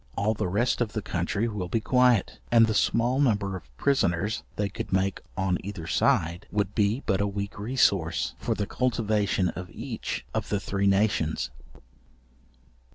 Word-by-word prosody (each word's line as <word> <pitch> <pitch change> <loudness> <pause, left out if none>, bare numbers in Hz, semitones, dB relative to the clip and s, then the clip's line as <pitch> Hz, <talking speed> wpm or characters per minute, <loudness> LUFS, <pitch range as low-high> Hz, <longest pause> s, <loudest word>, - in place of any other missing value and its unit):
All 105 +2 +2
the 105 - -2
rest 120 +8 +1
of 110 -3 -1
the 110 - -2
country 95 +6 -1
will 105 -5 -3
be 115 +6 0
quiet, 125 -2 +3
and 115 -1 +7
the 110 - 0
small 120 +4 +2
number 105 -8 +1
of 80 -10 -9
prisoners 105 - +1
they 105 - 0
could 100 - -6
make 95 +1 +1 0.2
on 95 -2 +1
either 95 -4 -6
side, 85 -5 +1
would 100 -1 -1
be 105 +5 +1
but 95 -1 +1
a 100 - +1
weak 100 0 -4
resource 100 -7 +1
for - - -1
the 105 - -1
cultivation 105 -6 0
of 90 0 -6
each 115 0 -5
of - - -2
the 105 - 0
three 100 0 -1
nations. 95 -8 +1
100 Hz, 165 wpm, -27 LUFS, 95-115 Hz, 0.2 s, and